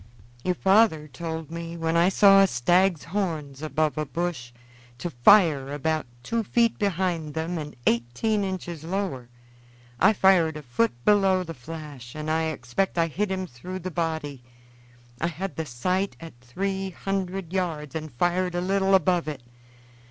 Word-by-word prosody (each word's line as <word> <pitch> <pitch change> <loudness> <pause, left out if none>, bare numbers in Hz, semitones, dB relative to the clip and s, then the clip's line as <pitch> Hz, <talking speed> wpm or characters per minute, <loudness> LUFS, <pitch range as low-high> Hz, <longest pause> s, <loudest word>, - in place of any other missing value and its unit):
"Your 180 - 0
father 190 -5 +3
told 160 +3 -6
me, 170 0 -6
when 165 0 -1
I 170 +2 +5
saw 195 0 +6
a 195 - +6
stag's 175 +5 +2
horns 160 -7 -3
above 155 0 0
a 155 - -1
bush, 140 -4 -3 0.5
to 175 +6 -4
fire 145 - +5
about 155 0 -1 0.2
two 230 - -1
feet 230 +2 +1
behind 175 -6 -1
them 165 +2 -2
and 150 -1 -7
eighteen 125 - +1
inches 175 -4 -5
lower. 165 -9 -3 0.7
I 220 - +6
fired 180 -6 +4
a 150 - -9
foot 120 -1 -1
below 195 -3 +4
the 165 -2 -7
flash, 145 -3 -9
and 155 0 -3
I 160 0 +1
expect 160 +4 -2
I 165 - +4
hit 190 +6 -2
him 190 -1 -2
through 180 +6 -8
the 185 0 -5
body. 160 -5 -3 0.8
I 170 - +2
had 180 +4 -5
the 160 -1 -4
sight 180 +10 -1
at 165 -1 -10
three 190 +9 -3
hundred 190 -1 -4
yards 160 -6 -2
and 155 -2 -5
fired 175 +7 0
a - - +1
little 195 +1 +2
above 180 -2 +2
it. 145 -5 -5
165 Hz, 160 wpm, -25 LUFS, 150-190 Hz, 0.8 s, saw